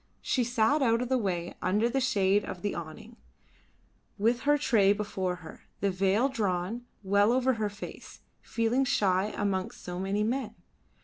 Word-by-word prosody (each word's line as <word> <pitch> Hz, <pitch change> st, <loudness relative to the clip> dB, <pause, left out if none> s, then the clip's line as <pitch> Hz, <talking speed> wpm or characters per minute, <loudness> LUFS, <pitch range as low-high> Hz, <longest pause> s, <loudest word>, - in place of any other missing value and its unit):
She 255 Hz, -, +1 dB
sat 245 Hz, +5 st, +2 dB
out 230 Hz, -3 st, +3 dB
of 250 Hz, -, -5 dB
the 260 Hz, -, +3 dB
way 180 Hz, -5 st, -2 dB
under 210 Hz, +5 st, +2 dB
the 265 Hz, +3 st, 0 dB
shade 200 Hz, -5 st, +2 dB
of 180 Hz, -, -7 dB
the 205 Hz, -, -1 dB
awning, 170 Hz, +8 st, -8 dB, 1.0 s
with 230 Hz, +4 st, +2 dB
her 295 Hz, -, +5 dB
tray 220 Hz, -9 st, +4 dB
before 195 Hz, -3 st, -2 dB
her, -, -, -12 dB
the 200 Hz, 0 st, +1 dB
veil 195 Hz, +6 st, +2 dB
drawn 215 Hz, -1 st, -2 dB, 0.2 s
well 200 Hz, +3 st, +3 dB
over 260 Hz, +1 st, +2 dB
her 215 Hz, -3 st, -1 dB
face, 205 Hz, +1 st, -10 dB, 0.2 s
feeling 230 Hz, +3 st, 0 dB
shy 195 Hz, -6 st, +2 dB
amongst 195 Hz, -2 st, -2 dB
so 180 Hz, 0 st, -5 dB
many 195 Hz, +2 st, 0 dB
men. 230 Hz, -1 st, -2 dB
210 Hz, 165 wpm, -29 LUFS, 190-240 Hz, 1.0 s, her